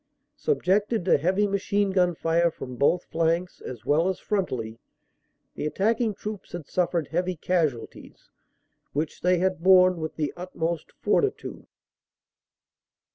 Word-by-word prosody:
Subjected 210 - +1
to 180 - +4
heavy 190 +7 +2
machine 200 0 0
gun 180 -2 +2
fire 165 +1 +2
from 130 -5 -8
both 155 +7 +2
flanks 170 +2 -1
as 125 - -8
well 160 +5 +3
as 190 - -2
frontally, 120 - -2 0.7
the - - -3
attacking 220 +5 0
troops 210 0 -7
had 175 -4 -6
suf 180 +3 0
fered 170 -4 -1
heavy 180 +2 -1
casualties, 155 -7 -3 0.6
which 150 +2 -3
they 180 0 +3
had 185 -1 0
borne 185 0 +6
with 160 -1 -5
the 150 -2 -2
utmost 170 -2 -4
fortitude. 415 -2 -1
180 Hz, 130 wpm, -26 LUFS, 160-190 Hz, 0.7 s, borne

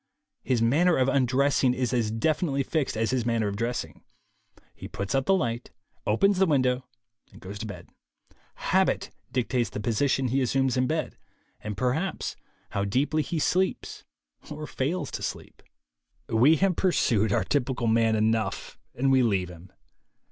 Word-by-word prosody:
His 120 -3 0
manner 165 +9 +3
of 130 0 +2
undressing 135 0 +2
is 125 0 -1
as 115 -3 +1
definitely 140 +5 0
fixed 140 -4 -1
as 115 +1 0
his 130 -2 0
manner 115 -2 0
of 100 - -3
dressing. 115 -9 -4 0.7
He - - -9
puts 100 0 -4
out 135 0 0
the 195 - +5
light, 120 -7 -2 0.4
opens 185 - +3
the 190 - +4
window 130 -4 +1 0.4
and - - -15
goes 100 +2 -8
to 110 - -5
bed. 100 - -9 0.8
Habit - - +2 0.2
dictates 125 -3 0
the - - -6
position 125 +4 +1
he 135 +3 +1
assumes 135 +1 +1
in 130 0 +1
bed, 160 +2 -2 0.5
and 105 -2 -5
perhaps 145 +10 -1 0.4
how 100 - -1
deeply 135 +10 +1
he 165 - -3
sleeps 185 +4 -1 0.5
or 150 0 -6
fails 155 +6 -2
to - - -5
sleep - - -6 0.7
We 125 +8 +5
have 185 +2 +1
pursued 115 - +2
our - - +2
typical 130 -4 -1
man 115 0 +3
enough, 110 -2 -1 0.2
and 135 +3 +1
we 130 -1 +5
leave 100 -7 +1
him. 90 +1 -13
125 Hz, 160 wpm, -26 LUFS, 110-145 Hz, 0.8 s, the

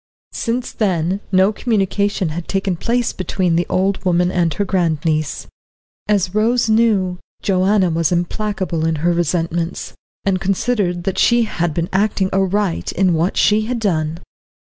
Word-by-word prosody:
Since 240 +1 -2
then 185 -3 0
no 190 +2 +4
communication 205 -4 0
had 165 +2 -5
taken 195 -1 -1
place 235 +7 -1
between 185 -2 -1
the 175 +1 0
old 190 +1 0
woman 180 -1 +2
and 170 -3 +1
her 205 - -1
grand 170 -6 0
niece. 155 -1 -1 0.6
As 195 -3 +1
Rose 230 +3 +2
knew, 215 -5 +2 0.2
Joanna 190 -1 +2
was 165 0 +1
implacable 180 -1 -1
in 165 - 0
her 175 - +3
resentments, 170 0 -2 0.3
and 190 -2 +1
considered 195 -3 0
that 195 0 -2
she 240 0 +4
had 175 -7 -2
been 170 0 -1
acting 195 -1 +1
aright 195 -1 0
in 185 -1 +2
what 165 +3 0
she 215 +1 +3
had 250 0 -1
done. 165 -7 -1
185 Hz, 150 wpm, -18 LUFS, 175-205 Hz, 0.6 s, no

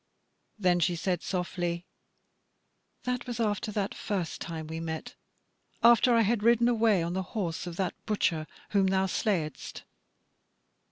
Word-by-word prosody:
Then 180 -4 +3
she 175 +1 +2
said 180 0 -1
softly: 175 -1 -2 1.2
"That 250 0 -2
was 240 -1 -4
after 210 -2 0
that 200 -1 -1
first 185 -6 -3
time 160 -2 -5
we 160 +1 -5
met; 160 -1 -5 0.7
after 235 +1 +6
I 230 - +5
had 225 0 +2
ridden 235 +1 +4
away 220 -6 +3
on 170 +1 -2
the 190 - 0 0.2
horse 175 -3 -2
of 170 - -5
that 185 0 -1
butcher 165 -7 0 0.2
whom 195 -2 +3
thou 190 0 +2
slayedst." 180 -5 -2
190 Hz, 145 wpm, -29 LUFS, 170-220 Hz, 1.2 s, after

